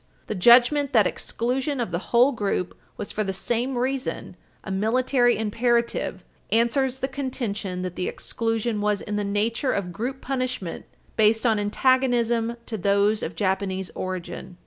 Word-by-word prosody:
The - - -3
judgment 245 +8 +5
that 220 -5 +5
exclusion 260 +8 -2
of 230 -7 -2
the 170 - -1
whole 245 +4 +5
group 200 -6 -2 0.2
was, - - -5
for 215 - -1
the 195 - -2
same 240 +6 -1
reason, 260 +2 -2 0.3
a 195 - -6
military 245 +5 +2
imperative 235 +2 0 0.3
answers 250 +3 +2
the 265 0 -2
contention 220 -9 -3
that 180 -1 -4
the 180 - -2
exclusion 225 -1 -2
was 210 -1 +1
in 210 - -4
the 205 - 0
nature 220 +6 0
of 180 -3 -3
group 250 +8 -4
punishment 255 -10 -3 0.3
based 220 +2 +3
on 220 -3 +3
antagonism 235 +1 +2
to 220 -3 -5
those 200 +3 +2
of - - -4
Japanese 190 -1 -1
origin. 185 -1 -6
225 Hz, 150 wpm, -24 LUFS, 200-250 Hz, 0.3 s, judgment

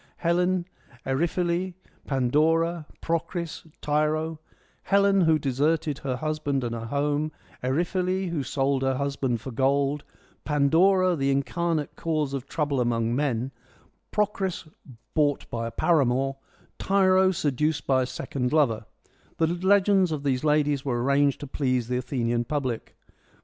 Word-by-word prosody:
Helen, 180 +1 +1 0.4
Eriphyle, 170 +6 0 0.3
Pandora, 155 +5 +1 0.2
Procris, 170 0 -3
Tyro: 155 +2 0 0.4
Helen, 200 0 +3
who 160 -2 +4
deserted 150 +2 0
her 130 -3 -2
husband 150 -1 -2
and 120 -1 -2
her 115 0 -5
home; 145 +3 0 0.3
Eriphyle, 180 +7 0
who 160 -4 -1
sold 135 0 0
her 135 0 +1
husband 135 -4 -1
for 130 - -6
gold; 140 +3 +1 0.4
Pandora, 175 +6 +3
the 135 -3 0
in 140 0 +2
carnate 165 -2 -2
cause 155 -4 -1
of 135 -1 -4
trouble 145 -4 -1
among 115 -1 0
men; 130 -3 -1 0.6
Procris, 195 -5 -1 0.5
bought 145 -2 +1
by 115 0 -2
a - - -5
paramour; 135 -4 +1 0.4
Tyro, 190 -1 +4
seduced 150 -3 0
by 130 -1 +3
a 125 - -1
second 125 -1 -3
lover: 120 -9 +2 0.5
the 165 - +3
legends 190 +2 +3
of 150 -2 -3
these 130 -2 0
ladies 150 -2 +2
were 120 -3 -1
arranged 140 +1 +2
to - - -4
please 130 -4 -1
the 125 - 0
Athenian 120 -2 -1
public. 130 -3 -3
145 Hz, 135 wpm, -26 LUFS, 135-170 Hz, 0.6 s, who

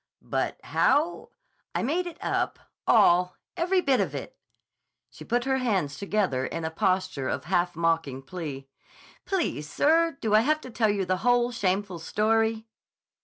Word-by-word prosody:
"But, - - -2
how—" 325 +4 +1 0.5
"I - - 0
made 340 +8 0
it 340 -1 -8
up. - - -1 0.3
All. 180 +1 +5 0.2
Every 365 +2 +2
bit 270 -6 +2
of - - -2
it." - - -6 0.8
She - - -11
put 240 0 0
her 265 0 +1
hands 190 - 0
together 190 -7 0
in 165 +4 -4
a 160 - -2
posture 185 -5 0
of - - -2
half 175 0 0
mocking 165 -5 0
plea. 140 -4 -6 0.6
"Please, 330 - -2
sir, 325 - +2
do 215 -2 -1
I 215 - +7
have 305 +7 +2
to 255 - -9
tell 225 -1 +2
you 200 -2 0
the 185 +1 0
whole 245 +4 +2
shameful 195 -4 -1
story?" 220 +5 +1
205 Hz, 160 wpm, -27 LUFS, 170-255 Hz, 0.8 s, I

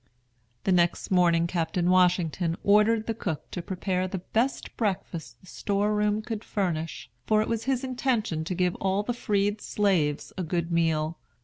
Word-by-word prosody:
The 190 - +1
next 175 0 +2
morning 170 -2 +4
Captain 170 0 -1
Washington 175 -2 +2
ordered 210 +2 +4
the 225 - -1
cook 180 -8 -5
to 180 - -4
prepare 185 0 -2
the 190 - -4
best 230 +8 -1
breakfast 190 -6 -3
the - - -19
store 205 +2 -1
room 210 +1 +1
could 225 -1 -4
furnish, 165 - -3 0.2
for 215 - +4
it - - -6
was 230 -1 -2
his 265 -1 0
intention 240 -10 -1
to 180 - -3
give 180 0 +1
all 195 +1 0
the 245 - -2
freed 205 -2 0
slaves 175 -8 0
a - - 0
good 170 0 -2
meal. 160 -1 +1
185 Hz, 170 wpm, -27 LUFS, 170-210 Hz, 0.2 s, morning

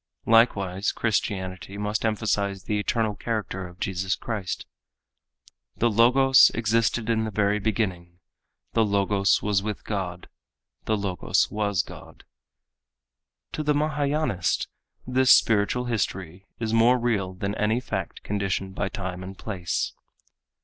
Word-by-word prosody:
Likewise 100 -4 +3
Christianity 95 -3 -2
must 105 +1 -2
emphasize 100 -3 -1
the 105 -1 -1
eternal 110 +1 0
character 100 -4 -3
of 90 +1 -15
Jesus 95 0 -1
Christ. 105 -6 -4 1.1
"The 120 0 +2
Logos 130 +4 +6
existed 115 0 +1
in 115 -1 +1
the 110 - -2
very 105 0 +1
beginning, 95 -5 -2 0.6
the 115 - +3
Logos 100 -1 +2
was 100 -2 +1
with 105 0 -4
God, 90 -4 -4 0.6
the 110 - +1
Logos 95 -5 0
was 100 -2 0
God." - - -13 1.3
To - - -3
the 150 0 +2
Mahâyânist 145 - 0 0.4
this 130 +1 +2
spiritual 115 +3 +4
history 95 -5 -3
is 110 -1 -2
more 115 +3 +5
real 105 -6 -1
than 100 +2 -3
any 110 +2 +1
fact 95 -8 -5
conditioned 95 -1 -2
by 95 +1 -2
time 95 -2 -5
and 95 +1 -8
place. 90 -6 -3
105 Hz, 125 wpm, -25 LUFS, 95-115 Hz, 1.3 s, Logos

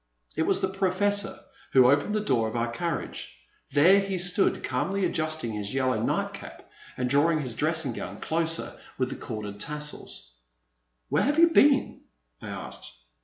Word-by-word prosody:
It - - 0
was - - +2
the 190 - +2
Professor 195 +2 0 0.4
who 130 -2 +7
opened 145 +9 +1
the 215 - +1
door 115 - +1
of 110 - -6
our 115 0 -1
carriage. 170 - -4 0.3
There 165 +8 +6
he 195 -1 -2
stood, 180 +2 +1
calmly 195 0 -1
adjusting 155 -7 -2
his 105 +2 -4
yellow 130 -1 +1
nightcap - - -3 0.3
and 125 - 0
drawing 150 +5 +3
his 125 -4 -4
dressing 155 -1 0
gown 100 -1 -7
closer 165 0 -1 0.2
with 130 -1 0
the - - -4
corded 105 -3 -6
tassels. 150 - -6 0.8
Where - - +2
have 290 +3 +1
you 335 +1 +7
been? 280 -4 +4 0.2
" - - -44
I - - -8
asked. - - -7
155 Hz, 165 wpm, -27 LUFS, 125-190 Hz, 0.8 s, who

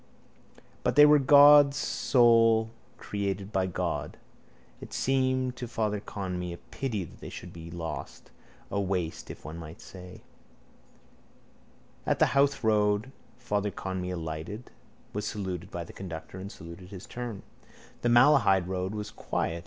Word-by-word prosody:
But 125 - +1
they 150 +1 +9
were 150 0 +6
God's 145 +1 +7
souls, 115 -5 +4 0.3
created 100 -1 -3
by 95 -2 +1
God. 90 - -3 0.6
It - - -10
seemed 130 -1 +1
to 125 - -5
Father 105 -2 -1
Conmee 90 -4 -5
a - - -8
pity 115 -4 -4
that 85 - -13
they - - -8
should 90 - -9
all - - -15
be 85 - -9
lost, 85 -1 -7 0.4
a 100 - 0
waste, 90 -4 -3
if - - -10
one 80 +2 -7
might 80 0 -10
say. 90 -1 -12 1.8
At - - +2
the - - +3
Howth 140 -2 +2
road 105 +2 +2 0.3
stop - - -28
Father 105 0 0
Conmee 95 -2 -4
alighted, 80 +7 -6 0.4
was 105 +1 -3
saluted 95 -4 -4
by 85 - -5
the 85 - -12
conductor 90 0 -8
and 100 +2 -7
saluted 85 +3 -11
in - - -13
his 95 -1 -9
turn. 120 -4 -6 0.6
The 120 - +1
Malahide 120 -7 +5
road 95 +2 -3
was 105 -1 -5
quiet. 85 +1 -2
100 Hz, 155 wpm, -28 LUFS, 90-120 Hz, 1.8 s, they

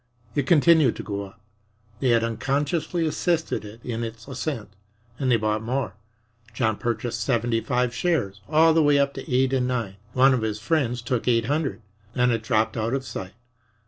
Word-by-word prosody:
It 140 0 -1
continued 160 -5 +5
to - - -6
go 100 -1 -4
up 95 +1 -16 0.6
they 130 - +1
had 115 -1 +4
unconsciously 145 +8 -1
assisted 160 - 0
it 110 +2 -12
in 115 -1 -3
its 115 +1 -7
ascent 130 -5 -4 0.5
and 130 -2 +1
they 120 - +5
bought 110 0 0
more. 125 -3 -2 0.6
John 110 -4 +1
purchased 120 0 -2
seventy 120 -2 +1
five 125 -1 0
shares 120 - -1
all 160 +1 +5
the 160 - +4
way 145 -1 +4
up 140 0 +2
to 155 - -8
8 130 +1 +2
and 125 -2 +1
9. 115 -6 -2 0.2
One 130 +1 +5
of 125 - 0
his 110 -1 -2
friends 125 -3 0
took 125 -2 -2
eight 115 -2 +3
hundred. 145 -3 -1 0.3
Then 125 -1 +3
it 115 -1 0
dropped 110 -1 +1
out 115 +2 -1
of 135 -1 -3
sight. 95 -5 -6
125 Hz, 185 wpm, -24 LUFS, 115-140 Hz, 0.6 s, continued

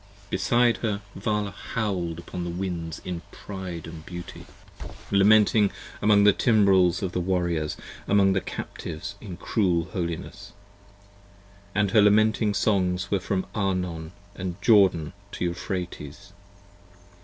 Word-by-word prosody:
Beside 120 +5 +3
her 105 -3 -2
Vala 105 +1 -1
howl'd 100 -5 -3
upon 90 +1 -6
the 85 - -3
winds 85 -2 -4
in 90 -2 -4
pride 95 -5 -7
of 80 -1 -9
beauty, 85 0 -9 0.3
97 - - -10 0.2
Lamenting 105 +1 +5 0.3
among 105 -1 +5
the 105 -1 +7
timbrels 100 -6 +4
of 95 - -1
the 90 - -1
Warriors, 85 -4 -1 0.3
among 100 -1 +4
the 95 - +1
Captives 85 +5 -6
In 95 -5 -8
cruel 90 -5 0
holiness: 85 -3 -5 1.2
and 105 -2 +2
her 105 - +6
lamenting 105 0 +4
songs 90 -3 +1
were 100 - +2
from 95 0 -2
Arnon 90 -5 -2 0.2
And 90 0 -5
Jordan 95 -8 +4 0.2
to - - -2
Euphrates. 85 -4 -5
95 Hz, 125 wpm, -26 LUFS, 85-105 Hz, 1.2 s, the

